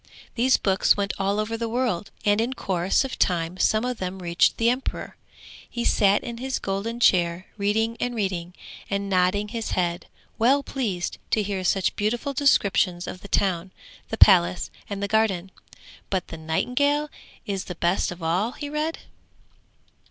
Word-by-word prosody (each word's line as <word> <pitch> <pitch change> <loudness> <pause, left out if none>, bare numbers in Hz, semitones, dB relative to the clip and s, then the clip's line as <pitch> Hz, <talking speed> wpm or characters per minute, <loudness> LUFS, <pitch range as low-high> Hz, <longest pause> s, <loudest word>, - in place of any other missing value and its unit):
These 250 +2 +3
books 190 0 +3
went 200 -1 -1
all 200 +2 0
over 215 +2 -1
the 230 0 -3
world, 225 -6 -1 0.2
and 205 +1 +3
in 240 +3 -1
course 190 -1 0
of 265 - -6
time 175 0 0
some 215 +5 +2
of 250 -1 -3
them 185 0 -4
reached 175 -1 +2
the 230 - +2
emperor. 250 +3 -2 0.5
He 235 -1 -3
sat 200 -2 +3
in 235 -1 -6
his 265 +1 -2
golden 200 +5 -3
chair 175 -4 +3
reading 220 +3 0
and 245 0 -2
reading, 185 -4 -3 0.3
and 200 0 -1
nodding 190 +3 +2
his 230 0 -4
head, 175 -1 -1 0.3
well 270 +5 +4
pleased 210 -11 -3
to 215 - +2
hear 195 -2 -3
such 185 +1 +1
beautiful 240 +7 -1
descriptions 200 -10 +2
of 185 - -7
the - - -9
town, 185 -3 0 0.4
the - - -3
palace 85 +1 +5 0.2
and 200 -1 -4
the - - 0
garden. 195 -4 +1 0.6
'But 190 -2 -2
the 165 - -7
nightingale 285 - 0 0.3
is 195 -3 -3
the 180 - -6
best 175 +3 +1
of 175 -1 -9
all,' 185 +9 0
he 290 - -6
read. 305 +2 -1
200 Hz, 165 wpm, -25 LUFS, 185-235 Hz, 0.6 s, palace